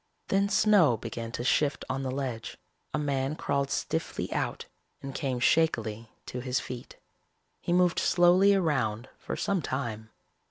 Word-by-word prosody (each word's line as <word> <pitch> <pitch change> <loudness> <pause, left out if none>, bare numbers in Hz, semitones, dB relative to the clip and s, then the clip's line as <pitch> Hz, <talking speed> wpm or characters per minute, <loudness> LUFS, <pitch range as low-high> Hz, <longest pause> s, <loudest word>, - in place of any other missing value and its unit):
Then 200 +1 +2
snow 200 - +4
began 115 +1 -6
to 120 - -3
shift 140 +2 +1
on 130 +1 -2
the 135 - -2
ledge. 130 -4 -4 0.3
A - - -1
man 140 -1 -1
crawled 140 -2 -1
stiffly - - -2
out - - -2 0.3
and 135 0 -7
came 130 -4 -2
shakily 115 -7 +1 0.2
to 125 - -5
his 125 0 -1
feet. 125 -1 -8 0.6
He - - -4
moved 180 0 +3
slowly 180 +3 +5
around 130 - 0
for - - -4
some 195 -3 0
time. 115 -6 -4
135 Hz, 150 wpm, -28 LUFS, 120-170 Hz, 0.6 s, slowly